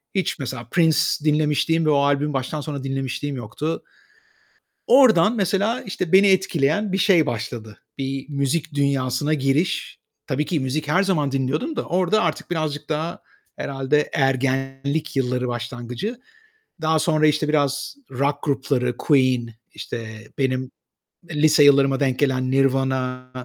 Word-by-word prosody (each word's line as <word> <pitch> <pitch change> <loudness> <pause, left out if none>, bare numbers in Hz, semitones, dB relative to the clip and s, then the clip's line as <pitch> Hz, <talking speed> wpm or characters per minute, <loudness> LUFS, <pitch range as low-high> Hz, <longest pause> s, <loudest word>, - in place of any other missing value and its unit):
hiç 190 -3 -1
mesela 130 -3 -6
Prince 160 -3 +3 0.3
dinlemişliğim 155 +2 +1
ve - - +2
o 150 - +4
albümü 145 +1 +1
baştan 135 +3 -3
sona 145 -2 -5
dinlemişliğim 135 +1 -3
yoktu. 130 +7 -4 1.0
Oradan 230 -5 +5
mesela 205 +4 0
işte 185 -3 -4
beni 195 +2 +7
etkileyen 190 0 +1
bir 190 - 0
şey 175 -5 +4
başladı. 115 -2 -5 0.2
Bir 135 0 -4
müzik 145 +2 -1
dünyasına 140 +1 0
giriş. 140 +5 -1 0.3
Tabii 145 +3 -1
ki 165 -4 -1
müzik 145 +3 -2
her 180 +6 +3
zaman 155 -8 0
dinliyordum 140 - -1
da - - -2
orada 185 +5 +1
artık - - -2
birazcık 155 -3 -3
daha 155 +2 -3 0.3
herhâlde 140 +2 -1
ergenlik 135 +1 -1
yılları 125 -1 0
başlangıcı. 120 - -5 0.6
Daha 160 0 +2
sonra 155 -1 +2
işte 150 0 +1
biraz 145 - 0 0.2
rock 140 +3 0
grupları, 135 -3 -1
Queen, 130 -5 +2 0.3
işte 110 -1 -7
benim, 130 -1 -1 0.6
eee, 160 - -6
lise 155 -1 +6
yıllarıma 140 -1 +5
denk 130 -3 0
gelen 130 -2 +1
Nirvana, 130 -1 0
140 Hz, 135 wpm, -22 LUFS, 130-160 Hz, 1.0 s, beni